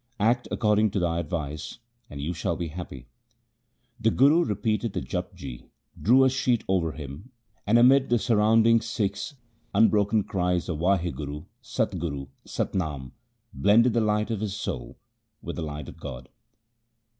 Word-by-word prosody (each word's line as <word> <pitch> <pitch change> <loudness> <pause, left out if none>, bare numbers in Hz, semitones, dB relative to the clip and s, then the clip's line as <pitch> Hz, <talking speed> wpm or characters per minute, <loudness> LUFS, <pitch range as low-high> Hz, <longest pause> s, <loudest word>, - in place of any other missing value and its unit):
Act 120 +4 +2
according 105 0 +2
to 100 - -1
my 85 -1 0
advice, 75 -2 -4 0.3
and 70 - -8
you 75 +5 -2
shall 85 - -2
be 85 -2 -4
happy.' 75 -6 -8 0.9
The 115 0 +3
Guru 145 +8 +5
repeated 110 - -1
the - - -1
Japji, 90 -9 -6 0.3
drew 130 +5 +5
a 130 - +5
sheet 125 -3 +1
over 85 -5 +1
him 75 - -9 0.4
and 110 +3 +5
amid 130 +3 +5
the 120 - +4
surrounding 115 +1 +4
Sikhs' 105 +3 -3 0.4
unbroken 105 0 +4
cries 90 -2 -1
of 80 -4 -2
Wahguru! 85 -5 -1 0.2
Sat 115 -6 -2
Guru! 70 -5 -3 0.2
Sat - - -3
Nam! 75 -8 -3 0.4
blended 105 - +4
the 115 - +2
light 105 +1 +1
of 110 - -1
his 105 -2 -2
soul 105 - -5 0.4
with - - -6
the - - -3
light 75 -1 -5
of - - -10
God. 65 -4 -8
100 Hz, 155 wpm, -26 LUFS, 80-115 Hz, 0.9 s, Guru